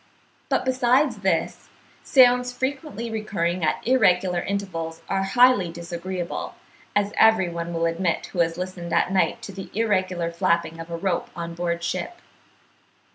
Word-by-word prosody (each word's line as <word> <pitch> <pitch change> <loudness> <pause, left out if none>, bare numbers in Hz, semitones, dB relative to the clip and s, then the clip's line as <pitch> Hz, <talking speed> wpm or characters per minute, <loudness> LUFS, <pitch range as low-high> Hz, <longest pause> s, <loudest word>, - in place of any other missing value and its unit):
But - - +1
besides 255 0 +2
this, 190 -4 -1 0.3
sounds 250 -1 +5
frequently 260 -2 -4
recurring 185 -5 -2
at 155 - 0
irregular 185 -8 +3
intervals 170 -5 -4
are 195 0 0
highly 205 -2 +4
disagreeable, 170 +1 -5 0.4
as 205 0 +1
every 220 -5 +5
one 170 0 -4
will 165 0 0
admit 165 +1 0
who 180 - -4
has 165 0 +1
listened 180 -2 -5
at - - +2
night 190 - +1
to - - -6
the 190 0 -8
irregular 185 -6 0
flapping 170 -1 0
of 165 +1 -8
a 170 - -4
rope 175 0 -1
on 170 -1 -5
board 170 0 -2
ship. 185 - -3
185 Hz, 145 wpm, -24 LUFS, 170-220 Hz, 0.4 s, sounds